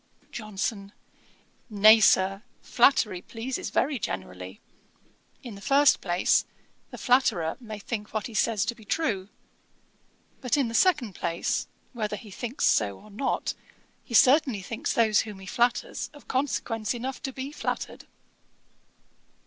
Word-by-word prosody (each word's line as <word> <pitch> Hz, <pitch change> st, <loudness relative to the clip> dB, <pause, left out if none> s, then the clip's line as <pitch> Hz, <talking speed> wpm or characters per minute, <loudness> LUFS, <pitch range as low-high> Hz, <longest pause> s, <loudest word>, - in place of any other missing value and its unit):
JOHNSON. 205 Hz, -2 st, -4 dB, 0.8 s
'Nay, 215 Hz, +1 st, +7 dB
Sir, 195 Hz, -1 st, +3 dB, 0.2 s
flattery 225 Hz, -7 st, +3 dB
pleases 240 Hz, +6 st, -5 dB
very 275 Hz, -2 st, 0 dB
generally. 95 Hz, -, -6 dB, 0.8 s
In 240 Hz, -4 st, -8 dB
the 200 Hz, -, -11 dB
first 280 Hz, +4 st, +4 dB
place, 175 Hz, 0 st, +2 dB, 0.5 s
the -, -, -9 dB
flatterer 245 Hz, -11 st, +2 dB
may 220 Hz, -4 st, -8 dB
think 210 Hz, 0 st, -5 dB
what 215 Hz, -2 st, -2 dB
he 235 Hz, -, -7 dB
says 215 Hz, -1 st, +1 dB
to 235 Hz, -, -1 dB
be 225 Hz, -, -17 dB
true: 205 Hz, -6 st, -1 dB, 1.1 s
but, 255 Hz, +2 st, +1 dB
in 265 Hz, -5 st, +1 dB
the -, -, -7 dB
second 255 Hz, -, +2 dB
place, 170 Hz, -1 st, -2 dB, 0.3 s
whether 215 Hz, -3 st, -3 dB
he 210 Hz, -1 st, -11 dB
thinks 240 Hz, +6 st, -3 dB
so 100 Hz, -3 st, +2 dB
or 215 Hz, -, -16 dB
not, 260 Hz, +7 st, -2 dB, 0.5 s
he 235 Hz, -, -5 dB
certainly 260 Hz, -4 st, +5 dB
thinks 225 Hz, +4 st, -3 dB
those 220 Hz, -2 st, +3 dB
whom 210 Hz, -3 st, -4 dB
he 190 Hz, -, -11 dB
flatters 240 Hz, +5 st, 0 dB
of 290 Hz, -, -16 dB
consequence 245 Hz, -4 st, -1 dB
enough 255 Hz, +2 st, -5 dB
to 270 Hz, -, -4 dB
be 265 Hz, +2 st, -6 dB
flattered.' -, -, -5 dB
220 Hz, 140 wpm, -27 LUFS, 200-255 Hz, 1.1 s, Nay